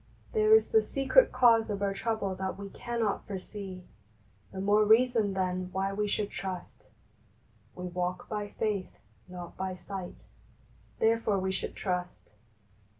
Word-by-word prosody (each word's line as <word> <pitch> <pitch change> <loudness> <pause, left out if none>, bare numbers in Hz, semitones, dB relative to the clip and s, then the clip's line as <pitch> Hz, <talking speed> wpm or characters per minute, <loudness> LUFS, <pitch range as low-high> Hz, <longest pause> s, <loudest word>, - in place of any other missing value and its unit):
there 435 -1 +6
is 445 - +4
the 445 -1 +5
secret 275 - +3
cause 230 -3 +5
of 200 -1 -2
our 200 -1 +1
trouble 200 -1 -1
that 190 0 -4
we 200 0 -7
cannot 230 -4 -2
foresee! 190 -1 -7 0.7
The 190 - -6
more 205 +2 +4
reason 220 -1 +4
then 185 -1 -1
why 195 +1 -1
we 210 +1 0
should 205 0 -1
trust. 185 -2 -6 0.4
" - - -33
VVe 180 -1 -6
walk 180 0 -2
by 210 -1 -3
faith, 205 -4 -2 0.3
not 180 -1 -9
by 190 -1 -3
sight, 185 0 -8 0.7
therefore 225 -2 +2
we 190 0 -1
should 190 - -4
trust. 180 - -4
200 Hz, 150 wpm, -30 LUFS, 185-225 Hz, 0.7 s, there